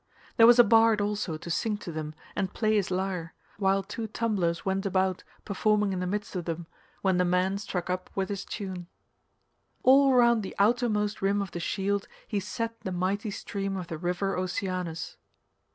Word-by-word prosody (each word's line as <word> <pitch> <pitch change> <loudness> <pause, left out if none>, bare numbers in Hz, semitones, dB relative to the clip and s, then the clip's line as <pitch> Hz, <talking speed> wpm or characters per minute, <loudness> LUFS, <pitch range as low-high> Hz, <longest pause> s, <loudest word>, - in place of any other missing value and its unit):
There 225 - +8
was 240 0 +8
a 240 - +10
bard 225 -1 +5
also 205 -5 -1
to 170 +2 -7
sing 210 +5 0
to 195 -4 -7
them 155 -1 -5 0.2
and 190 -2 -1
play 215 -1 +1
his 200 -3 +1
lyre, 185 -3 -2 0.2
while 195 -1 +2
two 225 +2 -5
tumblers 200 -7 -1
went 195 0 0
about 190 -2 0 0.2
performing 210 0 +1
in 185 - -2
the 180 - -2
midst 205 +1 -3
of 175 -2 -3
them 165 0 -4 0.4
when 190 -2 +3
the 180 - +3
man 180 +2 +1
struck 180 -4 -4
up 185 0 -3
with 190 -1 -1
his 200 -1 -3
tune. 185 -4 -6 1.0
All 270 +1 +6
round 235 -2 +5
the 195 - -7
outermost 210 -1 +2
rim 200 +1 +2
of 200 -3 -3
the 175 - -5
shield 200 +3 -1 0.2
he 210 - -1
set 230 +3 -4
the 190 - -4
mighty 190 +4 -1
stream 195 -1 -4
of 180 -2 -6
the 160 - -4
river 180 +3 -1
Oceanus. 180 -2 -3
195 Hz, 185 wpm, -28 LUFS, 180-210 Hz, 1.0 s, a